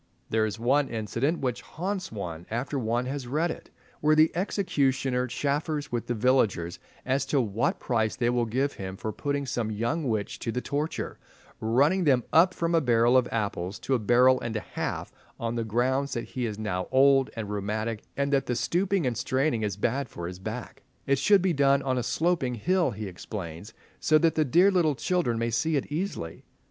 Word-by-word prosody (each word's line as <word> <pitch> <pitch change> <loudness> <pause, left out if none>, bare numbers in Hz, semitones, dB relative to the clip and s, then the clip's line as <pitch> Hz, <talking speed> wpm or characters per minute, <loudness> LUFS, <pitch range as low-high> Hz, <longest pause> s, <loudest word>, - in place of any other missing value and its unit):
There 110 0 +2
is 105 - -5
one 135 +4 +2
incident 115 +8 -1
which 125 -3 -1
haunts 185 +2 -4
one 85 -5 -6
after 125 +5 -2
one 120 +1 0
has 135 -1 -4
read 155 +6 0
it, - - -9 0.3
where 155 +1 +4
the 155 +1 +5
executioner 135 -9 0
chaffers 145 +3 -2
with 120 -1 -2
the 120 - -1
villagers 105 -8 +1 0.3
as 130 +1 +1
to 145 - +2
what 110 -2 0
price 110 -3 0
they 120 0 +1
will 120 -1 +1
give 135 +5 0
him 95 0 -6
for 110 +2 -4
putting 140 +3 -2
some 120 -4 -2
young 115 +9 -1
witch 105 -3 -2
to 115 - -3
the 125 - -1
torture, 145 +4 -3 0.4
running 145 +12 +2
them 130 -4 +4
up 180 +3 +5
from 170 0 -1
a 165 - +4
barrel 120 -1 +3
of 125 -1 +4
apples 100 -4 -2
to 135 - -1
a 130 - +3
barrel 125 +4 +4
and 115 -1 -4
a 110 - -1
half, - - -4 0.3
on 115 0 -2
the 115 -1 -1
grounds 130 +5 0
that 120 - -4
he 125 -2 -2
is 105 -2 -5
now 95 -4 -2
old 135 0 +5
and 110 -3 -4
rheumatic, 105 +2 -2 0.2
and 140 0 0
that 135 - +2
the 125 - 0
stooping 180 - +1
and 125 -2 0
straining 130 -1 0
is 100 -3 -2
bad 130 +7 -1
for 85 - -7
his 90 0 -7
back. 120 +6 -6 0.2
It 140 -1 +2
should 200 +3 +4
be 185 -2 +2
done 140 -1 +3
on 130 -2 0
a - - 0
sloping 155 -1 0
hill, 180 - +1
he 110 -2 -5
explains, 95 0 -7 0.3
so 155 - +4
that 165 0 +3
the 155 - +2
"dear 175 +9 +5
little 165 -6 +2
children" 170 -8 0
may 115 0 -1
see 160 +7 +1
it 140 - -2
easily. 150 - -4
125 Hz, 200 wpm, -27 LUFS, 110-145 Hz, 0.4 s, the